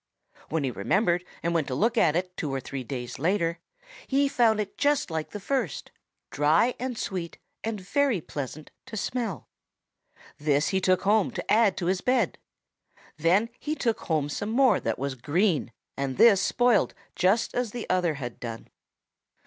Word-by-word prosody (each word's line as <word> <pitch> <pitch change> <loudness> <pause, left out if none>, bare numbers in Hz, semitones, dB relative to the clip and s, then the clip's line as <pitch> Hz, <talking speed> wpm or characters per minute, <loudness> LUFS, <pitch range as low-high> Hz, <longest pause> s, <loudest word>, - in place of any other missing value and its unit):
When 160 -2 0
he 130 - 0
remembered 175 - +1 0.2
and 170 +1 0
went 160 -4 +1
to 130 - -2
look 230 - +2
at 165 -9 +3
it 180 +1 -2
two 150 -4 -3
or 135 - -1
three 135 0 -6
days 125 0 -6
later, 170 +1 +1 0.5
he 280 +1 +3
found 235 -5 +3
it 205 -2 -3
just 290 - +1
like 160 -1 -3
the 210 - -7
first, 240 - -2 0.4
dry 155 - +3
and 250 -1 -3
sweet 180 -5 -4 0.3
and 220 -2 -3
very 255 +3 +1
pleasant 150 0 -7 0.2
to 220 - -6
smell. 215 - -3 0.9
This 145 0 +2
he 190 -1 0
took 185 -1 +2
home 205 0 +3
to - - -5
add 215 -3 +4
to 175 - -2
his 185 +1 +1
bed. 255 +4 +1 0.8
Then 180 +8 +3
he 305 +1 -2
took 230 -7 0
home 155 -4 0
some 205 +8 -4
more 255 +3 +4
that - - -2
was 140 0 -2
green, 155 - 0 0.2
and 135 -2 -3
this 205 -5 +7
spoiled 245 +1 +2 0.2
just 195 +5 +2
as 245 -2 -1
the 240 +2 -6
other 180 -4 +1
had 125 -4 -6
done. 115 -1 -7
185 Hz, 175 wpm, -27 LUFS, 150-225 Hz, 0.9 s, this